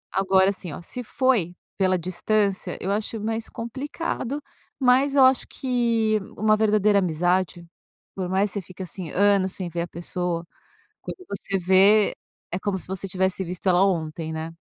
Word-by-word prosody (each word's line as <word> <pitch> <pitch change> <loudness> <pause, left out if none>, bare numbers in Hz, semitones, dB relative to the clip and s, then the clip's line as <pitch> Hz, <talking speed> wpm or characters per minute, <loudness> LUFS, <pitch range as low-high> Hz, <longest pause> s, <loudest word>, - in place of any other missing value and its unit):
Agora, 190 0 +4
assim, 185 -4 -7
ó, - - -7
se 250 +8 -6
foi 230 -8 +1 0.2
pela 185 -1 +2
distância, 190 +3 -1
eu 190 - -2
acho 215 +2 -2
mais 225 +1 -3
complicado, 275 +3 -4 0.4
mas 265 +2 +3
eu 275 - +7
acho 260 -1 +3
que 230 -4 +1 0.2
uma 215 +1 +4
verdadeira 210 -1 +3
amizade, 175 0 0 0.5
por 185 -2 -4
mais 195 +2 +1
você 200 - -3
fica, 185 +1 -9
assim, 180 -2 -7
anos 200 0 +3
sem 185 -2 -4
ver 170 0 -3
a 170 - -3
pessoa, 175 0 -3 0.6
quando - - -7
você 195 0 -3
vê, 190 +3 +5 0.4
é 180 - -2
como 195 -1 -1
se - - -8
você 190 +1 -4
tivesse 190 +1 0
visto 180 +1 -4
ela 180 +1 +5
ontem, 160 -3 -1
né? 160 +1 -5
195 Hz, 165 wpm, -24 LUFS, 180-215 Hz, 0.6 s, eu